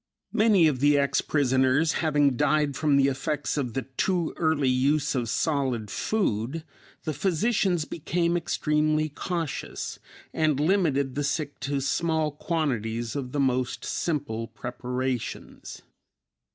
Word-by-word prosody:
Many 215 -6 +5
of 140 -5 0
the 145 +1 +4
ex 140 -1 +2
prisoners 130 +2 +2
having 145 -4 +3
died 150 +2 +2
from 150 -1 +2
the 135 0 +4
effects 140 +2 -2
of 130 -5 -2
the 135 - -1
too 165 +7 -1
early 160 -4 +1
use 140 +4 +2
of 120 -4 -1
solid 130 - -1
food, 155 - -1 0.4
the 155 - -2
physicians 185 - +1
became 170 +2 -1
extremely 155 -2 +1
cautious 165 +1 -4 0.3
and 155 -3 +1
limited 150 -6 +2
the 145 - -2
sick 145 +1 -2
to 140 0 -1
small 160 +2 0
quantities 120 -8 -2
of 130 -3 -4
the 145 - -2
most 130 -2 0
simple 140 -9 -2
preparations. 125 +1 -5
145 Hz, 125 wpm, -26 LUFS, 130-160 Hz, 0.4 s, Many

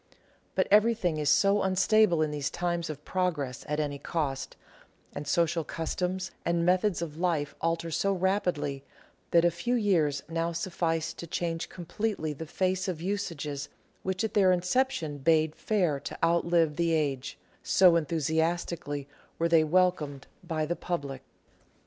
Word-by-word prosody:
But - - +2
everything 210 -6 +4
is 150 -1 +1
so 200 +7 +4
unstable 190 -2 +3
in 155 - -1
these 145 -2 -2
times 175 -1 -2
of 150 -1 -7
progress 160 -9 -2
at 150 0 0
any 145 -2 -2
cost, 140 -5 -3 0.6
and 145 - -6
social 170 -1 +1
customs 180 +4 -3
and 170 0 +1
methods 180 0 +2
of 155 -2 -7
life 165 -5 0
alter 165 0 -1
so 195 +5 +1
rapidly, 180 -7 0 0.5
that 170 0 +4
a 175 - +4
few 235 +9 -1
years 170 - +2
now 165 +1 -1
suffice 165 -2 -1
to 170 - -8
change 165 0 -2
completely 175 -2 -3
the 160 +3 -7
face 185 +3 0
of 180 -4 -3
usages 160 -7 -3 0.3
which 190 +2 -2
at 220 - -2
their 190 -3 +5
inception 180 - 0
bade 155 +1 +3
fair 180 -10 0
to - - -7
outlive 170 -2 +2
the 170 -1 +2
age 140 -4 -1 0.2
— - - -34 0.2
so 180 -3 +7
enthusiastically 160 -2 -1 0.3
were 165 - +2
they 165 -1 +5
welcomed 155 -5 +1 0.2
by 160 -3 -1
the 175 +3 -2
public. 140 -8 -4
170 Hz, 150 wpm, -29 LUFS, 150-185 Hz, 0.6 s, so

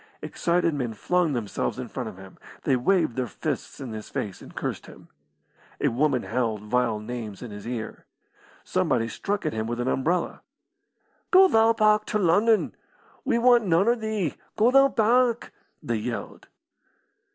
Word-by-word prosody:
Excited 170 -1 0
men 125 -6 -3
flung 175 +5 +1
themselves 115 -1 -2
in 125 -1 -5
front 125 -1 -5
of 100 - -12
him; 95 0 -13 0.2
they 130 - +2
waved 130 0 +1
their 130 -1 -1
fists 105 - -5
in 130 -5 -6
his 110 -1 -7
face 100 -3 -4
and - - -13
cursed - - -4
him. - - -15 0.7
A - - +2
woman 130 +1 +1
howled 115 -4 -2
vile 115 0 +1
names 110 -1 -6
in 120 - -8
his 105 +2 -9
ear. 120 -3 -6 0.6
Somebody 115 - 0
struck 200 - -3
at 155 - -1
him 110 0 -2
with 120 +1 -3
an 120 - -1
umbrella. 165 +7 0 0.9
"Go 380 +1 +7
thou 225 -7 +4
back 215 -1 +3
to - - -1
Lunnon. 210 +4 +3 0.5
We 255 -4 +2
want 240 -2 +4
noan 175 +6 +3
o' - - +5
thee. 220 - -2 0.2
Go 225 +3 +4
thou 275 +1 +6
back!" 240 0 +2 0.3
they - - -1
yelled. - - -6
150 Hz, 165 wpm, -25 LUFS, -, 0.9 s, Go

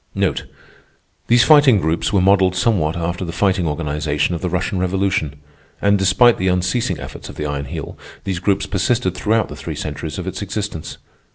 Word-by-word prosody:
These 120 0 +5
Fighting 135 -4 +6
groups 80 0 0
were 100 - +3
modelled 95 -1 +4
somewhat 90 -6 +1
after 85 +2 -3
the 85 - -4
Fighting 95 -1 +1
Organization 75 +1 -1
of 85 - -4
the 90 - -1
Russian 90 +1 -1
Revolution, 95 -5 0 0.4
and, 100 0 +2
despite 120 +5 +4
the 95 - 0
unceasing 90 - 0
efforts - - -9
of - - -9
the 75 - -4
Iron 70 -1 -3
Heel, - - -7 0.2
these 95 -3 -3
groups 100 +1 0
persisted 95 -1 0
throughout 110 +3 0
the - - -9
three - - -6
centuries 80 +4 -5
of 90 - -5
its 95 +1 -5
existence. 100 -5 -5
95 Hz, 175 wpm, -19 LUFS, 85-100 Hz, 0.4 s, Fighting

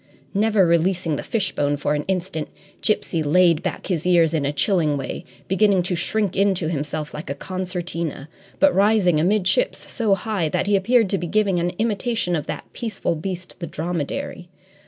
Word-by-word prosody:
Never 210 -1 +3
releasing 170 -1 +1
the - - -3
fishbone 145 -9 0
for 145 +1 0
an 150 0 -2
instant, 180 -4 -2 0.3
Gipsy 180 -5 +1
laid 165 +2 +4
back 185 - -4
his 170 -5 -1
ears 170 -3 +4
in 145 -3 0
a - - 0
chilling 155 -1 +1
way, 135 - -5 0.2
beginning 195 -1 +3
to 180 0 -1
shrink 200 +2 -1
into 190 -4 +1
himself 150 -1 -3
like 155 +6 -7
a - - -2
concertina, 175 -5 -4 0.3
but 290 0 +5
rising 195 -5 +3
amidships 205 - +1
so 220 -5 +2
high 195 -6 -2
that - - 0
he 205 0 +3
appeared 225 +3 +3
to 195 - +1
be 175 - -3
giving 200 -1 +2
an 175 +1 0
imitation 225 -4 0
of 150 - -3
that - - -5
peaceful 225 -7 -2
beast, 180 +2 -6
the 170 - -4
dromedary. 175 - -4
180 Hz, 175 wpm, -22 LUFS, 160-200 Hz, 0.3 s, but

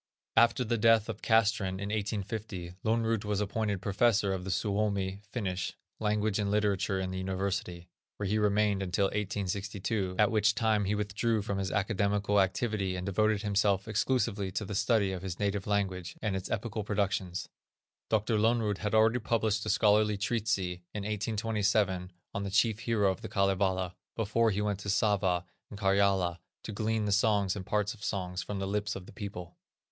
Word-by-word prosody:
After 120 +3 +5
the 115 -1 -1
death 115 -1 +4
of - - -5
Castrén 110 -4 +2
in 100 +1 -4
1850, 100 -3 -3
Lönnrot 115 -1 +1
was 105 -1 -1
appointed 105 -1 -1
professor 100 -1 +2
of 95 -1 -4
the 95 - -5
Suomi 100 -1 -1
(Finnish) 95 -6 -2 0.3
language 105 -1 0
and 100 -1 0
literature 100 -2 +1
in 95 -1 -2
the 95 - -3
University, 95 -2 -3 0.3
where 105 - -2
he 105 +3 +1
remained 105 -1 +2
until 95 +1 +1
1862, 100 0 -2
at 105 -1 +4
which 110 0 +3
time 110 -2 +2
he 100 +2 0
withdrew 105 +1 0
from 100 -2 -2
his 95 -1 -2
academical 100 0 +1
activity 95 -1 -1
and 90 0 -4
devoted 105 +2 +1
himself 100 -1 +1
exclusively 110 -3 0
to 105 - -3
the 105 - -5
study 100 -1 +2
of 95 -2 -4
his 90 -2 -5
native 100 -1 -1
language, 95 -4 -1
and 105 -3 -1
its 95 -1 -4
epical 110 0 -2
productions. 100 -3 -1 0.6
Dr. 110 +1 +1
Lönnrot 110 -2 +2
had 105 +1 -1
already 110 +2 +4
published 110 -2 0
a - - 0
scholarly 105 -1 +3
treatise, 110 +2 0 0.4
in 105 - -3
1827, 105 -3 0 0.2
on 100 - -2
the 100 - -3
chief 105 +2 +2
hero 110 -4 +2
of 95 - -6
the - - -6
Kalevala, 95 -2 +1 0.2
before 115 +1 +2
he 105 0 0
went 105 -2 -1
to 100 - -5
Sava 95 -4 +2 0.2
and 105 - -9
Karjala 95 -3 +2 0.2
to - - -5
glean 110 +1 -1
the 105 - 0
songs 100 -1 +2
and 95 - -5
parts 105 +2 0
of 105 - -14
songs 90 -3 -2
front 100 -1 -4
the 95 - -2
lips 105 +1 -1
of 95 - -7
the - - -13
people. 95 -5 -7
100 Hz, 175 wpm, -30 LUFS, 95-110 Hz, 0.6 s, After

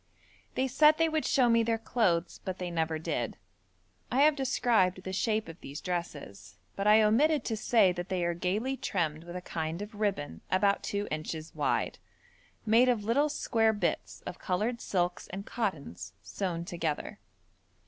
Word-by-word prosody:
They 265 - +1
said 300 +4 +5
they 330 0 +3
would 315 -1 -1
show 255 -3 +4
me 230 0 +4
their 225 0 +1
clothes, 190 -7 0
but 185 -1 -4
they 180 -1 -4
never 160 -1 0
did. 155 -6 -3 0.7
I 260 +4 +3
have 300 0 +6
described 230 -9 +1
the 190 - -5
shape 215 +2 0
of 165 +2 -10
these 140 +2 -7
dresses, 140 - -5 0.2
but 195 - -1
I 215 +1 +7
omitted 280 +7 +3
to 225 - -1
say 215 -3 +4
that 175 +1 -5
they 180 -2 0
are 175 - +1
gaily 205 +10 -1
trimmed 160 -8 -2
with 175 +1 -9
a 180 - -4
kind 160 0 -3
of 205 +2 -7
ribbon 195 - -2
about 200 +1 +2
two 205 0 -2
inches 155 +1 -4
wide, - - -1 0.7
made 230 +3 +5
of 235 -4 +1
little 280 +8 +2
square 225 -6 +1
bits 205 - -2
of - - -6
coloured 215 +6 -1
silks 175 -2 -1
and 195 +2 -7
cottons 145 - -4
sewn 175 -4 -3
together. 165 -4 -3
195 Hz, 170 wpm, -30 LUFS, 170-230 Hz, 0.7 s, I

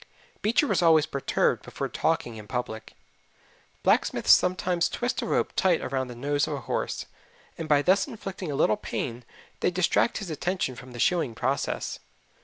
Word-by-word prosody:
Beecher 230 +7 +3
was - - +1
always 160 -3 +5
perturbed 140 -3 0
before - - -4
talking 155 -7 -1
in 105 -1 -10
public. 110 -3 -5 0.9
Blacksmiths - - +3
sometimes 180 -1 +3
twist 245 +1 -2
a - - -3
rope - - 0
tight 180 -3 +3
around 130 0 -2
the 125 - -8
nose 145 +4 0
of 150 - -2
a 140 - -6
horse, - - -3 0.5
and 160 -1 -6
by 145 -1 +4
thus 195 - +3
inflicting 195 - -6
a - - -2
little 110 -5 +3
pain 120 0 -4 0.4
they - - +2
distract 180 +6 +2
his 195 -6 -5
attention 175 -3 -1
from 125 +1 -11
the 120 - -8
shoeing 160 -6 +1
process. 130 +4 -2
155 Hz, 170 wpm, -27 LUFS, 125-180 Hz, 0.9 s, always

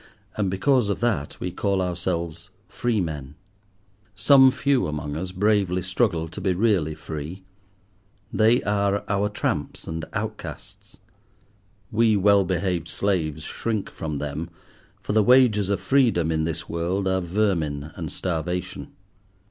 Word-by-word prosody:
And 100 -3 0
because 120 +4 +2
of 100 - -1
that, 105 -12 -1
we 90 - -3
call 100 +1 0
ourselves 85 -2 -2 0.2
free 120 -3 -1
men. 75 -5 -4 0.8
Some 130 +5 +7
few 135 - +1
among 75 -1 -4
us 90 +3 -4
bravely 95 -2 +1
struggle 95 -3 0
to 100 - -8
be 95 -2 +1
really 90 -7 +1
free: 80 +6 -7 0.9
they 115 +3 +4
are 100 0 +1
our 100 +1 +1
tramps 75 -8 -3
and 80 0 -4
outcasts. - - -7 0.9
We 110 -1 +3
well 100 0 +5
behaved 90 -2 -1
slaves 80 -6 -1
shrink 110 +3 -3
from 75 -2 -4
them, 75 +4 -4 0.5
for - - -2
the 110 - +5
wages 115 -4 +5
of 100 - +1
freedom 115 - +2
in 80 0 0
this 80 0 -4
world 90 +4 -1
are 95 0 +1
vermin 85 -6 -1
and - - -6
starvation. 90 0 -3
95 Hz, 135 wpm, -24 LUFS, 80-105 Hz, 0.9 s, Some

